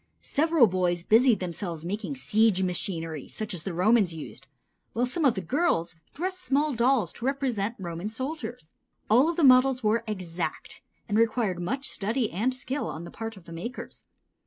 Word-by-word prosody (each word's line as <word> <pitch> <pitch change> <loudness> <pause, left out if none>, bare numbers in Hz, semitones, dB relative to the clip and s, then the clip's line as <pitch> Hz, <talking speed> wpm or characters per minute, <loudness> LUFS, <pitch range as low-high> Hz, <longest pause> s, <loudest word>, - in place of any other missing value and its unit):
Several 315 -2 +4
boys 180 -3 0
busied 230 +3 +5
themselves 170 -2 -4
making 210 +9 -3
siege 220 -6 +2
machinery 165 -4 -2
such 215 -2 -5
as 175 - -3
the 190 - -4
Romans 190 +2 +3
used, 135 -3 -9 0.5
while 240 +2 +1
some 300 +5 -1
of 260 - +4
the 190 - -2
girls 215 - 0 0.2
dressed 370 +4 -3
small 295 -3 +1
dolls 240 0 +2
to 240 - -7
represent 245 -6 -1
Roman 175 +1 -5
soldiers. 250 - -6 0.4
All 255 +8 +6
of 340 - -1
these 330 - +4
models 255 0 +5
were 220 +2 +2
exact 185 -5 -4 0.3
and 210 0 +1
required 220 -5 +1
much 265 +10 -2
study 225 +3 -1
and 220 +9 0
skill 260 +2 -3
on 160 - -6
the 170 - -9
part 225 -1 -6
of 180 - -15
the 170 - -10
makers. 210 +10 -7
220 Hz, 175 wpm, -27 LUFS, 180-260 Hz, 0.5 s, All